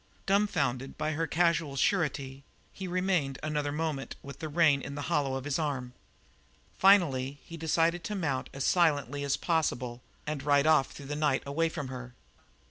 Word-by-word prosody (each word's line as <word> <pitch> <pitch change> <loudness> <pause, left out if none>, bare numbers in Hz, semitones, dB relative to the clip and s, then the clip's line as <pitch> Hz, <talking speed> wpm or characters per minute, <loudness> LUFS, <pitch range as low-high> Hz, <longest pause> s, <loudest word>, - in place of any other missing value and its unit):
Dumfounded 170 -10 0
by 155 0 -1
her 160 +1 -1
casual 165 -4 +1
surety, 140 -5 0 0.3
he 190 - -6
remained 180 -7 0
another 150 -2 -1
moment 150 -3 -3
with 140 -1 -9
the 160 - -4
rein 150 -3 +4
in 140 - -6
the 145 - -4
hollow 140 -4 +1
of 135 - -4
his 145 +2 -1
arm. 135 -5 -2 0.9
Finally 145 -9 +4
he 165 - -9
decided 165 +2 +1
to 210 - -3
mount 145 -9 -2
as 135 - -4
silently 145 -6 +2
as 140 -1 0
possible 125 -7 -1 0.2
and 150 -2 -3
ride 145 0 +3
off 155 -4 +5
through 145 - -10
the 145 +2 -4
night 150 -3 +1
away 160 +4 0
from 145 -5 -5
her. 125 -1 -8
145 Hz, 170 wpm, -30 LUFS, 135-165 Hz, 0.9 s, off